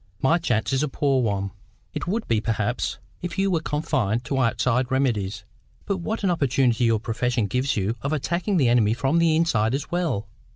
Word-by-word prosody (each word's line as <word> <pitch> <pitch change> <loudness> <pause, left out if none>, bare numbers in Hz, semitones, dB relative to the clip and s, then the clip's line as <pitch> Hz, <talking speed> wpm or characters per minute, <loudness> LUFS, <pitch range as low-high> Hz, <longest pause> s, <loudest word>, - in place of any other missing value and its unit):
My 165 +6 +3
chance 120 -5 0
is 135 - +2
a 150 - +1
poor 135 -1 +1
one." 100 -4 -1 0.4
"It - - -4
would 220 +5 -1
be, 110 -2 +1
perhaps, 110 +1 -1 0.2
if 175 +1 -5
you 195 0 +2
were 165 -3 +1
confined 125 -8 -1
to 135 +3 -1
outside 125 +1 +1
remedies. 105 -8 -1 0.4
But 200 -2 -1
what 215 +5 -3
an 190 - +3
opportunity 130 -6 +2
your 115 -2 +3
profession 120 +1 -1
gives 125 +5 0
you 100 +3 0
of 140 - -2
attacking 170 +6 0
the 135 -6 +3
enemy 115 -2 +3
from 135 +7 +1
the 165 -2 +3
inside 125 -8 +2
as 140 - -5
well! 165 - -1
130 Hz, 195 wpm, -24 LUFS, 115-165 Hz, 0.4 s, My